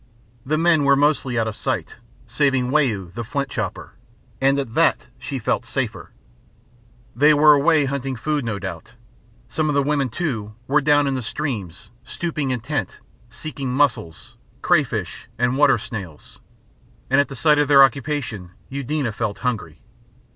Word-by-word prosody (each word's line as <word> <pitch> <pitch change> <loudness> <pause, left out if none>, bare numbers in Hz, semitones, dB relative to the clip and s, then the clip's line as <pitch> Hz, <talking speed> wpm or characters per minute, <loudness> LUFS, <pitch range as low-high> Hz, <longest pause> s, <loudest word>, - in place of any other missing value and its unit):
The 155 +4 0
men 165 -2 +3
were 140 0 +5
mostly 140 -3 +1
out 115 -1 +1
of 110 - -4
sight, - - -3 0.3
saving 135 -4 +1
Wau, 110 - +1
the 115 - -4
flint 140 +4 -3
chopper; - - -5 0.5
and 135 +1 +3
at 135 -5 -3
that - - +2
she - - -5
felt - - -1
safer. - - -4 1.1
They 150 +5 +5
were 150 +1 +7
away 150 +1 +3
hunting 135 -1 -3
food, 150 +4 -2
no 115 -3 -3
doubt. 95 -2 -7 0.5
Some 155 -1 -1
of 145 - 0
the 140 - +3
women, 140 -2 0
too, 110 -7 -4
were 145 +4 +2
down 145 0 +3
in 135 - 0
the 130 - -2
stream, 110 - -3 0.3
stooping 150 -2 -3
intent, 125 - -3 0.3
seeking 135 +2 -6
mussels, 125 - -1 0.3
crayfish, - - 0
and 125 +2 +1
water 140 -2 +4
snails, 95 -9 -9 0.7
and 135 +2 +4
at 145 - -2
the 135 - -8
sight 150 +2 +3
of 150 - +2
their 140 -1 +8
occupation 135 - -1 0.2
Eudena 140 -1 -2
felt 105 -1 -3
hungry. 105 -11 -3
135 Hz, 155 wpm, -22 LUFS, 115-145 Hz, 1.1 s, their